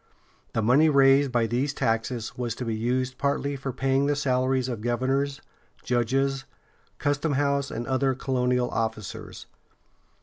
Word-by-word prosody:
The 115 - 0
money 135 +8 +5
raised 135 -1 +5
by 120 -2 +2
these 130 +5 -1
taxes 115 +1 -1
was 120 -3 -3
to 125 - -5
be 115 - -1
used 125 +3 -1
partly 140 0 0
for 135 0 -4
paying 135 +2 +1
the 145 - +2
salaries 130 -2 +1
of 120 -4 -4
governors, 135 +4 -1 0.4
judges, 135 +3 0 0.5
customhouse 140 -1 0
and 120 +1 -4
other 130 0 +1
colonial 125 -2 0
officers. 110 -2 -4
130 Hz, 135 wpm, -26 LUFS, 120-140 Hz, 0.5 s, money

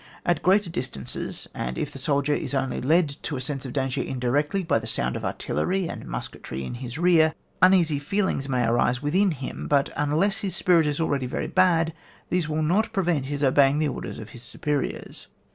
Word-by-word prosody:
At 175 -3 +1
greater 190 -1 +3
distances, 120 - -5
and 60 0 -4
if 145 - -2
the 135 - -8
soldier 140 0 +1
is 145 - -2
only 135 -1 -1
led 160 +5 +3
to 150 - -3
a - - -3
sense 135 +1 -4
of 125 - -7
danger 135 -2 -1
indirectly 145 +8 0
by 160 - +2
the 110 - -7
sound 65 - -1
of - - -5
artillery 190 -1 -1
and - - -7
musketry 65 +2 -5
in - - -5
his 125 +1 -6
rear, 165 -2 +4 0.3
uneasy 175 -5 +5
feelings 145 -3 -1
may 125 -2 +1
arise 120 +3 +1
within 185 +7 +3
him, 135 -6 -5
but, 140 -1 +2
unless 155 +9 +1
lus 190 -3 -2
spirit 170 -5 +4
is 150 +1 -1
already 140 -5 0
very - - -3
bad, 165 -3 +3 0.4
these 175 -4 0
will 155 0 0
not 195 +9 +2
prevent 175 -8 +1
his 145 0 -3
obeying 135 +1 +4
the 155 -1 +1
orders - - -5
of 110 - -8
his 120 - -11
superiors. 145 +3 -3
145 Hz, 195 wpm, -25 LUFS, 130-170 Hz, 0.4 s, uneasy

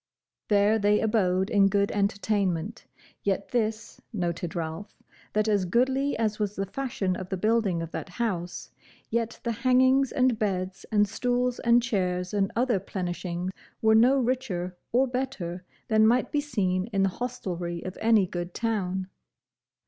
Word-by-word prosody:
There 210 +1 +3
they 205 0 +3
abode 190 -3 +1
in 200 -3 +5
good 200 0 +1
entertainment; 200 -1 -1 0.3
yet 195 0 -1
this 220 -2 -2
noted 175 -4 -3
Ralph, 165 +4 -5 0.3
that 215 +1 +1
as 205 -3 +2
goodly 265 +8 +1
as 215 -1 -1
was 210 -1 -1
the 195 - -2
fashion 200 -3 -2
of 185 0 -6
the 190 - -2
building 215 -4 +1
of 165 - -7
that - - -5
house, 180 -5 -3 0.4
yet 230 0 -1
the 235 - 0
hangings 260 +3 +3
and 255 -3 +2
beds, 190 -3 -2
and 210 -1 +4
stools, 245 +3 0
and 235 0 +4
chairs, 180 -5 -1
and 195 -1 +1
other 240 -3 +2
plenishing 180 -1 -4 0.3
were 220 0 +4
no 245 +5 +6
richer 235 -9 -1 0.2
or 255 +3 +4
better 245 -9 -4 0.2
than 220 -1 +4
might 245 +3 +2
be 295 - +1
seen 190 -9 -1
in 200 -4 0
the 195 - +3
hostelry 180 -9 -4
of 185 - -6
any 220 -3 +4
good 175 0 -5
town. 190 -5 -1
205 Hz, 155 wpm, -27 LUFS, 185-235 Hz, 0.4 s, no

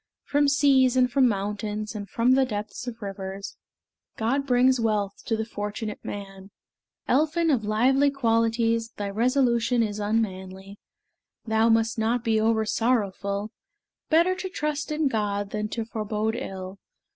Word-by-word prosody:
From 290 0 +2
seas, 275 -3 +4
and 250 -1 +3
from 260 0 +4
mountains, 210 0 -3
And 205 -3 -6
from 235 +4 +2
the 265 +1 +5
depths 210 0 -5
of 230 -2 -6
rivers, 195 0 -6 0.6
God 270 +5 0
brings 255 0 +4
wealth 210 -3 -1
to 225 - 0
the 220 - -2
fortunate 210 0 -5
man. 195 -1 -8 0.6
Elphin 315 +4 +2
of 245 -6 +1
lively 260 +7 +3
qualities, 230 -3 +1
Thy 200 -1 -3
resolution 240 +1 +2
is 210 -1 -3
unmanly: 195 -2 -3 0.7
Thou 220 0 +2
must 225 0 +2
not 230 +2 0
be 225 -2 +2
oversorrowful: 215 -2 0 0.6
Better 335 +3 +4
to 375 0 -4
trust 300 -3 -3
in 305 -1 +1
God 205 -4 -1
than 210 0 -2
to 225 +1 -3
forebode 220 0 -2
ill. 190 -3 -6
225 Hz, 140 wpm, -25 LUFS, 205-255 Hz, 0.7 s, the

